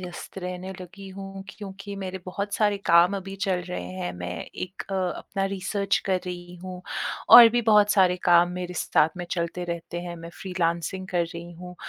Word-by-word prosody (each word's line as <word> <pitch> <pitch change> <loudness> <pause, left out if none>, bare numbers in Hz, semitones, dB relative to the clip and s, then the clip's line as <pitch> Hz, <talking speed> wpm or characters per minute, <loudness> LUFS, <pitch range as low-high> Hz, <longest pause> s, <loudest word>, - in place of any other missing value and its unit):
व्यस्त 180 +1 -8
रहने 180 +1 -5
लगी 195 +2 -10
हूँ, 195 0 -8
क्योंकि 200 0 -8
मेरे 190 -1 -5
बहुत 200 +2 -3
सारे 205 -2 +2
काम 170 +3 +6
अभी 195 0 -6
चल 185 -3 +1
रहे 180 - -4
हैं। 90 -1 -4
मैं 90 0 -5 0.3
एक 185 +1 -5
अ, - - 0
अपना 190 +1 -2
रिसर्च 195 +1 0
कर 190 -1 +2
रही 175 0 -6
हूँ 185 -1 -6 0.5
और 240 -1 +12
भी 240 +1 +1
बहुत 210 -2 +5
सारे 185 -2 +4
काम 175 0 +6
मेरे 180 0 -5
साथ 155 - +3
में 175 - -4
चलते 170 +1 -2
रहते 170 0 -5
हैं। 175 -1 -6
मैं 165 0 -9
फ्रीलानसिंग 180 0 -2
कर 175 -2 +1
रही 170 +1 -8
हूँ 180 +1 -10
180 Hz, 185 wpm, -26 LUFS, 175-195 Hz, 0.5 s, और